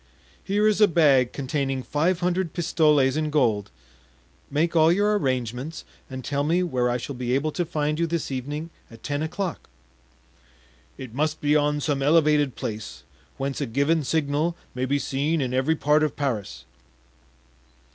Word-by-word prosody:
"Here 205 +2 +2
is 215 0 +2
a 210 - +8
bag 140 -8 +4
containing 135 -1 -2
five 170 +7 0
hundred 180 -2 0
pistoles 150 -5 +2
in 155 0 -1
gold; 115 -9 +1 0.8
make 160 +4 0
all 160 0 +5
your 205 +3 +2
arrangements, 130 - -2 0.2
and 130 -1 -7
tell 140 0 -1
me 170 +5 +2
where 125 -8 0
I 120 - 0
shall 130 +3 -6
be 125 0 -1
able 150 +3 0
to 175 +3 -2
find 150 -1 -1
you 170 - +1
this 165 -3 -3
evening 145 +5 -4 0.2
at 115 -1 -15
ten 145 0 -2
o'clock." 170 +2 -4 1.3
"It 130 -4 -9
must 155 +4 -1
be 150 0 +2
on 150 0 +1
some 145 -2 -1
elevated 150 -2 +3
place, 110 -1 -6 0.3
whence 135 +1 -3
a 140 - -1
given 140 +7 +1
signal 155 +3 0 0.2
may 125 0 -2
be 140 +2 +1
seen 145 +4 -1
in 130 -3 -2
every 135 +5 +2
part 150 0 +2
of 155 -3 0
Paris." 125 -9 -3
150 Hz, 165 wpm, -24 LUFS, 130-160 Hz, 1.3 s, a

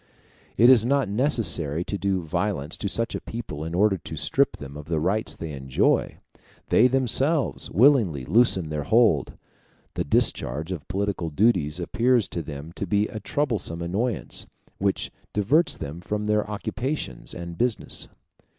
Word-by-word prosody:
It 120 +4 +7
is 120 -4 +6
not 135 0 +1
necessary 100 - +1
to 100 - -4
do 95 -2 -1
violence 85 -2 -2
to 100 - -2
such 115 +6 -1
a - - -4
people 115 -10 -6
in 80 +1 -4
order 95 0 +3
to 80 0 -8
strip 105 - +1
them 70 0 -9
of 75 0 -8
the 80 0 -1
rights 100 +7 -1
they 80 -1 -6
enjoy; 65 -2 0 0.5
they 125 - +6
themselves 135 +2 +1
willingly 105 - +3
loosen 95 - +3
their 75 -1 -2
hold. 110 - +3 0.6
The - - -1
discharge 75 +3 +1
of 85 -6 -6
political 95 -2 -2
duties 85 -3 +2
appears 120 +5 +2
to 85 - -3
them 75 0 -8
to 100 - -3
be 105 +3 +1
a 110 - -6
troublesome 105 - -2
annoyance, 105 +6 -3 0.3
which 100 0 -1 0.2
diverts 140 - +2
them 80 +3 -7
from 105 +3 -3
their 105 0 +1
occupations 105 - -4
and 85 -1 -7
business. 120 +3 -1
100 Hz, 155 wpm, -25 LUFS, 80-115 Hz, 0.6 s, It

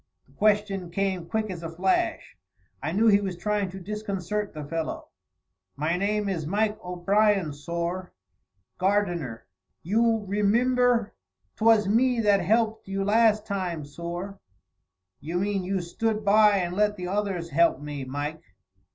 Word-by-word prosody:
The - - -26
question 205 -3 +1
came 190 -1 -2
quick 215 -2 -1
as 175 -2 -6
a 165 - -5
flash. 180 +3 -1 0.5
I 155 - -2
knew 210 +6 +2
he 205 -2 +5
was 190 -3 -4
trying 205 +1 -1
to 190 +1 -8
disconcert 210 0 -3
the 150 -2 -7
fellow. 165 +1 -4 0.7
"My 155 +5 0
name 205 +2 0
is 165 -6 -2
Mike 210 +4 0
O'Brien, 185 -1 +1
sorr, 170 +5 -4 0.7
gardener; 175 - 0 0.4
you 225 +3 +2
remimber, 235 +3 +2 0.4
'twas 220 -2 +4
me 240 +4 +3
that 205 -2 +3
helped 220 +3 +1
you 195 0 -2
last 215 +1 +3
time, 180 -7 -3
sorr." 175 +6 -6 0.8
"You 165 +4 -4
mean 195 0 0
you 190 0 -1
stood 215 +5 -2
by 210 0 +5
and 175 -1 -2
let 210 +1 +2
the 180 -1 -4
others 190 -3 -2
help 165 -1 +3
me, 145 -2 -6
Mike." 145 +4 -4
195 Hz, 145 wpm, -26 LUFS, 170-210 Hz, 0.8 s, he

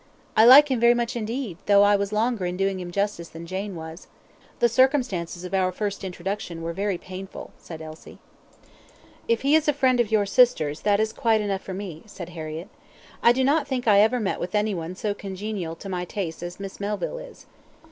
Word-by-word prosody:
"I 220 - +7
like 280 +4 +9
him 255 - +1
very 235 +1 +5
much 240 +1 -2
indeed, 225 -4 -4
though 200 0 +6
I 205 0 +5
was 200 0 -1
longer 215 -3 0
in 180 0 -4
doing 195 0 0
him 180 -1 -6
justice 200 -2 -2
than 165 +1 -9
Jane 190 +2 -4
was. 160 +1 -9 0.5
The 240 - +4
circumstances 235 - +1
of 180 - -7
our 185 -1 +2
first 200 +1 -4
introduction 180 -2 -5
were 165 0 -3
very 195 +1 -1
painful," 185 +2 -9
said 160 -2 -9
Elsie. 155 0 -11 1.1
"If 230 -1 +1
he 280 +2 +3
is 315 -1 +4
a 295 - +4
friend 260 -3 +2
of 230 -3 +1
your 210 -2 +3
sister's, 195 - +3
that 205 -1 +2
is 220 0 0
quite 225 -2 +2
enough 200 -2 -2
for 190 - -7
me," 185 -5 -7
said 180 -4 -8
Harriett. 160 0 -7 0.5
"I 235 - +6
do 260 +2 +1
not 285 +2 +2
think 255 -3 -3
I 205 -2 +6
ever 220 +4 +4
met 200 -4 -2
with 180 +3 -4
any 210 0 +1
one 170 0 -5
so 205 +1 -2
congenial 195 -3 -5
to 195 - -10
my 180 -2 -3
tastes 180 -2 -5
as 175 +1 -7
Miss 195 -1 -7
Melville 210 - -3
is. - - -12
200 Hz, 210 wpm, -24 LUFS, 180-230 Hz, 1.1 s, like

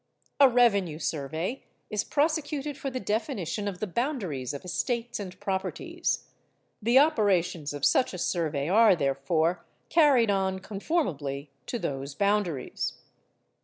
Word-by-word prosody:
A 275 -2 +8
revenue 200 -10 +3
survey 160 - -3 0.3
is 210 -1 0
prosecuted 295 -1 0
for 275 -1 -4
the 255 -1 -4
definition 210 -3 -2
of 190 -3 -4
the 215 - -1
boundaries 190 - -2
of 145 +4 -7
estates 235 +5 -2
and 185 -3 -7
properties. 190 -1 -2 0.6
The 235 +4 +4
operations 190 - +3
of 145 -1 -1
such 255 - +3
a - - -5
survey 155 -5 -1
are 210 +2 +6
therefore 155 +4 0 0.3
carried 275 -9 +5
on 190 -1 0
conformably 185 - -2 0.2
to 240 - -2
those 140 - -4
boundaries. 200 -8 0
195 Hz, 130 wpm, -28 LUFS, 160-240 Hz, 0.6 s, A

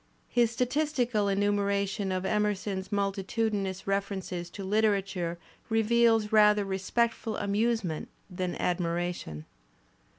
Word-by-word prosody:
His 240 -1 +3
statistical 250 -3 0
enumeration 200 0 0
of 185 0 -2
Emerson's 205 -2 -1
multitudinous 200 -1 -1
references 195 -3 -2
to 195 +2 -7
hterature 195 -4 +1 0.3
reveals 225 -1 +3
rather 210 -1 +5
respect 195 +5 0
ful 220 -2 -5
amusement 205 -5 0 0.2
than 180 -1 -3
admiration. 175 - -2
200 Hz, 95 wpm, -29 LUFS, 190-220 Hz, 0.3 s, rather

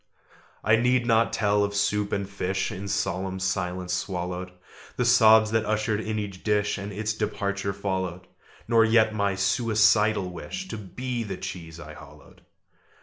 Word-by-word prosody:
I 110 +1 +4
need 125 +1 +2
not 115 -1 +3
tell 105 -1 +2
of 100 0 -2
soup 100 0 0
and 100 -1 -1
fish 95 -1 -2
In 100 +2 -6
solemn 95 -1 -2
silence 90 -1 -2
swallowed, 90 0 -3 0.5
The 125 - +1
sobs 110 -2 +6
that 110 0 +2
ushered 110 0 0
in 110 0 -3
each 100 -3 -5
dish, 105 -1 +1
And 100 +1 -6
its 110 +2 -2
departure 100 -2 -2
followed, 95 -2 -3 0.4
Nor 115 -1 +5
yet 110 0 +4
my 100 -2 0
suicidal 105 0 +2
wish 185 - -6
To - - -5
be 120 +5 -4
the 100 -4 -5
cheese 85 -2 -7
I 80 -1 -9
hollowed. 75 -1 -15
100 Hz, 155 wpm, -26 LUFS, 95-110 Hz, 0.5 s, sobs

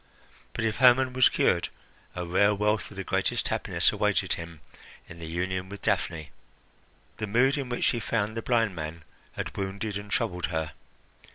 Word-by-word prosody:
But 115 - -2
if 110 -1 0
Hermon 125 +1 +5
was 130 -1 +6
cured, - - +2 0.5
a 90 -1 -3
rare 100 +4 +3
wealth 105 +1 0
of 100 - -13
the 95 - -3
greatest - - 0
happiness - - +1
awaited - - +1
him 85 -2 -7 0.5
in 85 - -11
the 80 - -6
union 95 +3 -2
with 100 0 -9
Daphne. 85 -7 -1 0.9
The 110 - -3
mood 125 +6 +3
in 135 -3 -3
which 120 - -2
she 120 - +2
found 110 -1 -1
the 115 - -2
blind 115 -5 +1
man 80 0 -6 0.3
had - - -5
wounded 100 +2 -3
and 100 0 -8
troubled 90 -3 0
her. 80 -1 -2
100 Hz, 175 wpm, -28 LUFS, 90-115 Hz, 0.9 s, was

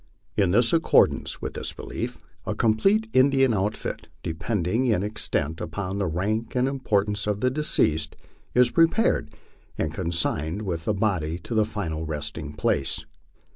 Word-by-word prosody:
In 95 -2 +2
accordance 125 +8 +3
with - - -3
this - - -3
belief - - -5 0.3
a - - -1
complete 195 - +3
Indian 135 -1 +4
outfit, 105 +1 -2 0.2
depending 95 +7 -1
in 105 -5 +2
extent 80 -6 -2
upon 95 +3 -4
the 100 - 0
rank 105 +9 -2
and 125 +1 +2
importance 105 -7 0
of 105 -1 0
the 125 +3 +2
deceased, 80 - +1 0.4
is 125 0 +5
prepared, 165 - +3 0.5
and 80 -1 -1
consigned 85 +1 -1
with 85 -5 -3
the 105 - +1
body 90 -6 0
to - - -5
the 110 -1 +3
final 85 -8 -4
resting 75 -1 -4
place. 75 -2 0
100 Hz, 140 wpm, -25 LUFS, 80-120 Hz, 0.5 s, is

